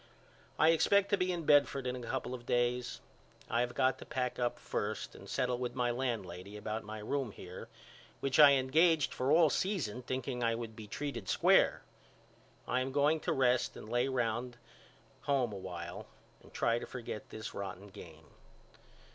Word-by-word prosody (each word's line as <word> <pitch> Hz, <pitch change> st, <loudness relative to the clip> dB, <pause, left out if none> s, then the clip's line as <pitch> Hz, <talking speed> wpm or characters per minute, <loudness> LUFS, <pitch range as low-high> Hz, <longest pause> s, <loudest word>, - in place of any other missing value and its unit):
I 155 Hz, -, +5 dB
expect 200 Hz, +5 st, +4 dB
to -, -, +6 dB
be 185 Hz, 0 st, +1 dB
in 170 Hz, -3 st, -3 dB
Bedford 140 Hz, -2 st, +4 dB
in 125 Hz, 0 st, -1 dB
a -, -, -6 dB
couple 130 Hz, 0 st, -3 dB
of 120 Hz, -1 st, -8 dB
days. 120 Hz, 0 st, 0 dB, 0.5 s
I 115 Hz, -, +2 dB
have 120 Hz, 0 st, -2 dB
got 130 Hz, 0 st, +2 dB
to -, -, -8 dB
pack 125 Hz, -1 st, -2 dB
up 120 Hz, -1 st, 0 dB
first 105 Hz, +1 st, -3 dB
and 100 Hz, -, -12 dB
settle 125 Hz, -2 st, 0 dB
with 125 Hz, -1 st, -3 dB
my 125 Hz, -1 st, +1 dB
landlady 105 Hz, -6 st, -4 dB
about 110 Hz, +1 st, -4 dB
my 110 Hz, +1 st, -7 dB
room 120 Hz, +3 st, -2 dB
here 90 Hz, -1 st, -9 dB, 0.5 s
which 135 Hz, +1 st, 0 dB
I 145 Hz, -2 st, +10 dB
engaged 150 Hz, +4 st, +3 dB
for 130 Hz, +2 st, 0 dB
all 160 Hz, -1 st, +6 dB
season 150 Hz, -, -1 dB
thinking 125 Hz, 0 st, -3 dB
I 115 Hz, 0 st, +2 dB
would 115 Hz, -1 st, -6 dB
be 110 Hz, -1 st, -9 dB
treated 120 Hz, -4 st, -5 dB
square. -, -, +4 dB, 0.8 s
I 125 Hz, -, +1 dB
am 130 Hz, +1 st, -2 dB
going 145 Hz, +3 st, +3 dB
to -, -, -2 dB
rest 125 Hz, -1 st, +2 dB
and -, -, -9 dB
lay 120 Hz, +3 st, +1 dB
round 120 Hz, -1 st, -1 dB, 0.7 s
home 130 Hz, -6 st, +2 dB
a -, -, -5 dB
while 90 Hz, -2 st, -7 dB, 0.3 s
and -, -, -18 dB
try 115 Hz, 0 st, +1 dB
to -, -, -7 dB
forget 115 Hz, -4 st, -7 dB
this 110 Hz, -, -7 dB
rotten 100 Hz, 0 st, -6 dB
game. 80 Hz, -4 st, -12 dB
125 Hz, 180 wpm, -33 LUFS, 110-135 Hz, 0.8 s, I